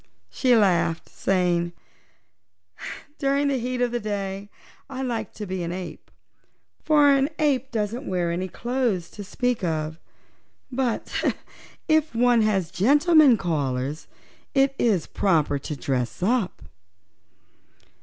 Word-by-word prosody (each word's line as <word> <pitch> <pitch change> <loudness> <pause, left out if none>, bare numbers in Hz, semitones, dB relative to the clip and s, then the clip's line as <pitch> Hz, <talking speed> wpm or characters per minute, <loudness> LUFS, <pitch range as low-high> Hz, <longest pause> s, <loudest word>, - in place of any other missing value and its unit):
She 255 -2 +3
laughed, 180 -6 +2
saying: 175 -2 0 1.5
"During 280 0 +1
the 270 -2 0
heat 250 +1 -3
of 245 - 0
the 240 - -1
day 200 -2 -4 0.4
I 265 -1 -4
like 230 -5 -3
to 210 - -6
be 185 -1 -4
an 170 0 -3
ape, 175 -3 -7 0.7
for 295 -2 +5
an 275 +1 +3
ape 270 -4 +1
doesn't 230 +3 -3
wear 175 -2 0
any 180 +2 -2
clothes 235 -3 -2
to 205 - -8
speak 245 +3 -1
of. 160 -1 -2 0.7
But 250 -2 -2 0.7
if 315 -5 +2
one 240 0 +4
has 195 -6 +1
gentlemen 290 - +5
callers 145 -4 -2 0.5
it 270 0 +4
is 200 -9 +2
proper 155 -7 +1
to 150 +2 -5
dress 130 +3 -2
up." 220 -2 0
210 Hz, 125 wpm, -24 LUFS, 175-255 Hz, 1.5 s, for